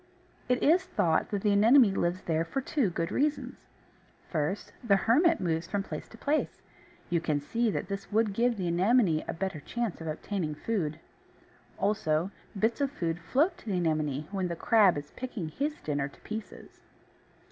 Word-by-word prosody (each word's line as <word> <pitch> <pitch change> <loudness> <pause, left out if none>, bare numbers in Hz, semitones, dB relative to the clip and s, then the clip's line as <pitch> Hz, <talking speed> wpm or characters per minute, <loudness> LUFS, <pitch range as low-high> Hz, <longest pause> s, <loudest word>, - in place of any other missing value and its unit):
It 250 0 +2
is 345 +5 +5
thought 175 - +1
that 205 -2 -2
the 210 - +3
Anemone 220 +2 +6
lives 180 0 -1
there 165 -1 0
for 170 +11 -3
two 270 -4 0
good 165 +1 -2
reasons. 295 +2 -1 0.6
First, 160 +4 -2
the 210 -4 +4
Hermit 310 - +3
moves 165 -1 -1
from 195 +1 -1
place - - -6
to 225 - -14
place; 295 +6 -1 0.5
you 170 -2 +2
can 150 -3 0
see 230 +11 0
that 190 - -2
this 195 +1 -5
would 215 -1 +2
give 235 +2 +1
the 185 -3 -2
Anemone 180 -1 +3
a - - -2
better 190 -2 -3
chance 230 +4 -3
of 160 - -6
obtaining 155 0 -3
food. 160 -4 -2 0.8
Also, 195 -4 0 0.3
bits 225 +6 +1
of 280 - +2
food 170 - -3
float 285 - +1
to - - -17
the 195 -3 0
Anemone 155 -4 0
when 190 -2 -1
the 170 - -3
crab 200 -2 +4
is 145 0 -7
picking 240 -10 -5
his 290 - -3
dinner 145 -2 -1
to 140 - -17
pieces. 215 0 -8
195 Hz, 180 wpm, -29 LUFS, 165-235 Hz, 0.8 s, Anemone